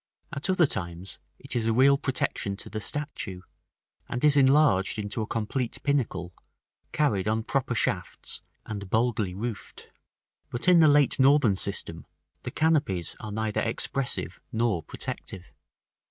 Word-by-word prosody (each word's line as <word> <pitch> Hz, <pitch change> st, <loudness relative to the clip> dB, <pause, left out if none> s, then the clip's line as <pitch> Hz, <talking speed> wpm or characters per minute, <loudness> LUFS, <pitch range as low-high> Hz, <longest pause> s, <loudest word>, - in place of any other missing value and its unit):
At 145 Hz, +5 st, -2 dB
other 185 Hz, -3 st, +4 dB
times 85 Hz, -, -3 dB, 0.2 s
it -, -, -7 dB
is 115 Hz, -2 st, 0 dB
a 115 Hz, -, +2 dB
real 135 Hz, +4 st, +6 dB
protection 130 Hz, -7 st, -1 dB
to -, -, -4 dB
the 110 Hz, -, -4 dB
statue, 125 Hz, -10 st, -4 dB, 0.7 s
and 120 Hz, -, -3 dB
is 150 Hz, -1 st, +5 dB
enlarged 135 Hz, -8 st, +4 dB
into 105 Hz, +1 st, -2 dB
a 110 Hz, -, -3 dB
complete 115 Hz, +1 st, -2 dB
pinnacle, 105 Hz, -, -1 dB, 0.6 s
carried 105 Hz, -11 st, +1 dB
on 110 Hz, +1 st, 0 dB
proper 130 Hz, 0 st, -1 dB
shafts, -, -, -2 dB, 0.2 s
and 100 Hz, -3 st, -6 dB
boldly 110 Hz, -4 st, 0 dB
roofed. 110 Hz, +1 st, -6 dB, 0.6 s
But 120 Hz, -, -3 dB
in 180 Hz, -2 st, +7 dB
the 160 Hz, -, +7 dB
late 145 Hz, -3 st, +4 dB
northern 135 Hz, -6 st, +5 dB
system 90 Hz, -4 st, -3 dB, 0.3 s
the -, -, -5 dB
canopies 145 Hz, -, +1 dB
are 110 Hz, -, -7 dB
neither 110 Hz, 0 st, -1 dB
expressive 135 Hz, -2 st, -2 dB
nor 110 Hz, -6 st, 0 dB
protective. 90 Hz, +3 st, -6 dB
115 Hz, 140 wpm, -27 LUFS, 100-140 Hz, 0.7 s, in